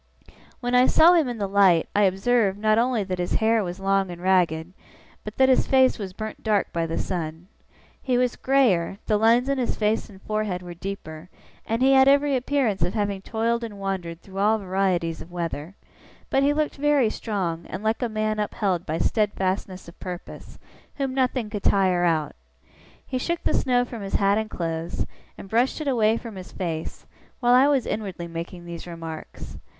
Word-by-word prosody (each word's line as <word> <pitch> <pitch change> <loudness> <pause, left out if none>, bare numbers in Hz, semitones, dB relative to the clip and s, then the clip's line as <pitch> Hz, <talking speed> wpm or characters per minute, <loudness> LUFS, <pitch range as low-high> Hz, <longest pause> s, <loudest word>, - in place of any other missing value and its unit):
When 245 0 -2
I 250 +1 +6
saw 335 +3 +6
him 320 -7 +3
in 240 - -4
the 205 - -1
light, 190 -4 +4
I 205 0 +5
observed, 195 +1 +2
not 215 +1 +2
only 240 -3 +1
that 185 -1 -4
his 175 - -1
hair 225 0 +2
was 180 0 -5
long 195 0 +1
and 175 -1 -7
ragged, 175 -2 +1 0.5
but 210 0 -8
that 265 - +5
his 260 - +3
face 260 -2 +4
was 195 -3 -5
burnt 215 +3 -7
dark 210 -3 0
by 165 -1 -1
the 165 - -3
sun. 165 -1 -4 0.5
He 255 -2 0
was 250 -1 +1
greyer, 230 -10 +2
the 215 - +2
lines 230 +4 +4
in 275 -1 0
his 245 - -1
face 215 +1 0
and 195 -2 -14
forehead 215 -4 -3
were 175 -1 -8
deeper, 170 -2 -7 0.4
and 230 +3 0
he 270 +1 +5
had 265 0 +6
every 280 0 +4
appearance 255 -6 0
of 175 +5 0
having 200 -2 -1
toiled 230 +3 -1
and 215 -3 -6
wandered 180 -4 -4
through 195 0 -8
all 215 +2 +3
varieties 185 -4 -1
of 175 - -12
weather; 170 0 -5 0.6
but 270 - +3
he 280 +1 +3
looked 300 0 -1
very 280 -5 +3
strong, 175 -7 -3
and 185 +3 -6
like 220 +3 0
a 245 - 0
man 215 0 -1
upheld 195 -4 -1
by 160 +1 -1
steadfastness 190 -3 -1
of 170 - -14
purpose, 180 -2 -8 0.4
whom 270 -2 -2
nothing 255 -3 0
could 210 -1 -5
tire 185 -3 +3
out. 155 -4 0 0.7
He 255 - -3
shook 340 +6 -2
the - - +1
snow 245 -1 +2
from 235 -3 -8
his 195 - -4
hat 200 +1 +3
and 220 0 -4
clothes, 165 -2 -3 0.3
and - - -10
brushed 235 +9 +1
it 310 - -4
away 225 -4 +3
from 230 -5 -8
his 185 - -9
face, 165 -3 -5 0.3
while 245 -1 +3
I 260 +3 +6
was 275 -4 +2
inwardly 195 -5 -4
making 170 +1 -7
these 170 0 -8
remarks. 165 -2 -8
205 Hz, 195 wpm, -24 LUFS, 180-245 Hz, 0.7 s, I